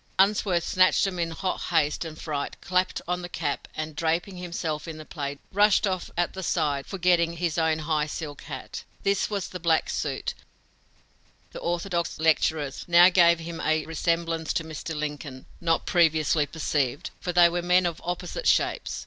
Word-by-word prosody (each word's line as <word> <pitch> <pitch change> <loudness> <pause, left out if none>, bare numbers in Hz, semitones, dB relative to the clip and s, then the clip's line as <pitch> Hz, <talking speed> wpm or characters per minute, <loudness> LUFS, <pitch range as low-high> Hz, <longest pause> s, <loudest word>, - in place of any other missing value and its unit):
Unsworth 190 -3 +3
snatched 185 +1 +3
them 185 -2 -3
in 165 -1 0
hot 185 +3 -3
haste 155 -3 +1
and 155 -1 -8
fright, 145 -3 -4
clapped 185 +1 0
on 180 +1 -1
the 175 - -7
cap, 150 -4 -3
and, 155 -1 -4
draping 165 +5 -1
himself 170 -3 -4
in 160 -1 -6
the 155 - -9
plaid, 145 -3 -5
rushed 205 +2 +4
off 185 -2 -2
at 175 0 0
the 190 - -6
side, 150 -6 0
forgetting 175 -3 +2
his 170 -2 -1
own 160 -1 +2
high 155 -1 0
silk 150 -1 -6
hat. - - -7 0.2
This, 200 0 +1
with 200 -3 -3
the 180 - -6
black 165 -1 +1
suit, - - -2 1.2
the - - -7
orthodox 170 0 -2
lecturer's, 155 -3 +1
now 175 +1 +8
gave 170 -2 +5
him 165 0 -6
a 155 0 +1
resemblance 165 0 -1
to 165 - -1
Mr. 160 0 -6
Lincoln, 145 -3 -5 0.2
not 165 -1 +1
previously 155 -3 +3
perceived, 145 -4 -1
for 180 - -3
they 175 0 +7
were 175 +1 -1
men 180 +1 +3
of 170 -2 -2
opposite 180 - -3
shapes. - - +1
165 Hz, 175 wpm, -26 LUFS, 155-180 Hz, 1.2 s, now